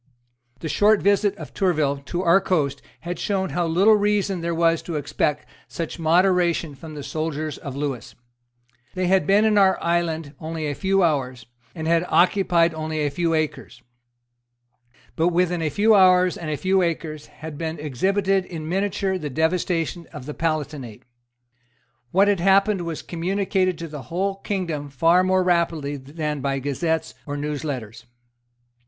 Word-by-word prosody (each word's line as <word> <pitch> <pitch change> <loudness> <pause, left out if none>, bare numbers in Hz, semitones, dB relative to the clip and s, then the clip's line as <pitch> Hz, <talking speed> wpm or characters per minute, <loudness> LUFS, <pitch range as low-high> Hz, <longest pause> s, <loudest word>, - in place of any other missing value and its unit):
The - - -4
short 210 +5 +3
visit 200 0 +2
of - - -9
Tourville 155 -8 +1
to 175 +7 -3
our 180 +2 +5
coast 145 -8 0 0.2
had 175 0 -5
shown 190 -2 -1
how 175 -1 -1
little 190 +7 +4
reason 205 -3 0
there 170 0 -2
was 165 0 +2
to 170 - -6
expect 150 0 -1 0.2
such 165 +1 -5
moderation 170 -1 +2
from 155 +3 -10
the 145 - -6
soldiers 155 0 -3
of 140 -2 -7
Lewis. 140 -4 -4 0.8
They 185 0 0
had 190 +1 +2
been 205 +2 +4
in 210 -1 +4
our 190 -1 +4
island 165 -3 -1
only 160 -1 -4
a 145 - -1
few 195 +4 +1
hours, 130 -7 -1 0.3
and 160 -2 -5
had 165 0 +3
occupied 175 -2 +3
only 155 -1 -2
a 145 - -1
few 165 +2 0
acres. 155 -3 -3 1.3
But 165 - +2
within 175 0 +1
a 160 - 0
few 210 +9 +3
hours 185 -2 +5
and 160 - -6
a 150 - -2
few 190 +3 +2
acres 160 -3 -3
had 155 0 -9
been 165 0 -3
exhibited 190 +7 0
in 160 -4 -7
miniature 190 +1 -1
the 150 -3 -4
devastation 165 +2 -1
of 150 -5 -9
the 150 - -5
Palatinate. 145 -8 -3 1.1
What 195 +6 +4
had 205 -3 +2
happened 195 +2 +3
was 165 -2 -5
communicated 185 +1 -1
to 165 - -6
the 150 -2 -8
whole 190 - -2
kingdom 170 -8 -3
far 165 +6 +3
more 185 0 +2
rapidly 165 -5 0
than 150 +2 -4
by 135 0 -1
gazettes 155 +4 -2
or 145 0 -3
news 145 -1 -3
letters. 120 -5 -6
165 Hz, 160 wpm, -23 LUFS, 150-185 Hz, 1.3 s, our